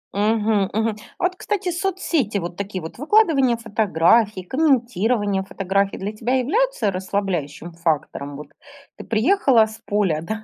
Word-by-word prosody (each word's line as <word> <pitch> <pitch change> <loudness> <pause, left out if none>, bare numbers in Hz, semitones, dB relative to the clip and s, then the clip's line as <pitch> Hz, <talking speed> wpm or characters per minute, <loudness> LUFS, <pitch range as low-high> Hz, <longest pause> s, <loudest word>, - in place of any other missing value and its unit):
Мгм, 210 -1 +1
мгм. 220 +1 0 0.2
Вот, 360 0 0
кстати, 385 -1 -2
соцсети, 340 - -1
вот 175 -2 -4
такие 195 -2 -5
вот 160 - -9
выкладывание 290 - +3
фотографий, 210 -2 +2
комментирование 230 - +1
фотографий 195 0 -1
для 200 +2 -4
тебя 235 +4 -1
являются 275 - +1
расслабляющим 180 -4 -3
фактором? 150 -4 -2
Вот 150 - -9 0.5
ты - - -9
приехала 240 - +3
с 220 0 -11
поля, 200 -7 +1
да, 220 +6 -5
215 Hz, 130 wpm, -21 LUFS, 190-260 Hz, 0.5 s, выкладывание